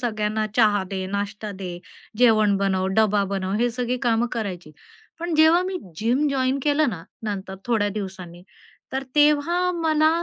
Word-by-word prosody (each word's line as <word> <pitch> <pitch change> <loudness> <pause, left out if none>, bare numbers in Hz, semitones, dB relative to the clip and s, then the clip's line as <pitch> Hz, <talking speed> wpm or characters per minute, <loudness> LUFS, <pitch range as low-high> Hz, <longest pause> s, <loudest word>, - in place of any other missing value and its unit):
सगळ्यांना 215 -2 -1
चहा 210 -4 +4
दे, 190 -1 -3
नाश्ता 205 +2 -4
दे, 185 -3 -6 0.4
जेवण 215 -4 +4
बनव, 190 -1 0
डब्बा 210 -2 +3
बनव 190 -1 -2
हे 245 0 +2
सगळी 245 +1 -2
कामं 235 -1 +2
करायची. 185 -8 -4 0.5
पण 340 -1 -2
जेव्हा 320 +3 +5
मी 370 0 -3 0.2
जिम 245 - +1
जॉइन 265 -1 0
केलं 295 +1 +2
ना, 170 -6 -7 0.2
नंतर 200 -3 -4
थोड्या 220 -4 +1
दिवसांनी 185 -4 -7 0.5
तर 265 +1 -1
तेव्हा 300 +5 +3
मला 315 -2 +2
220 Hz, 155 wpm, -23 LUFS, 200-285 Hz, 0.5 s, जेव्हा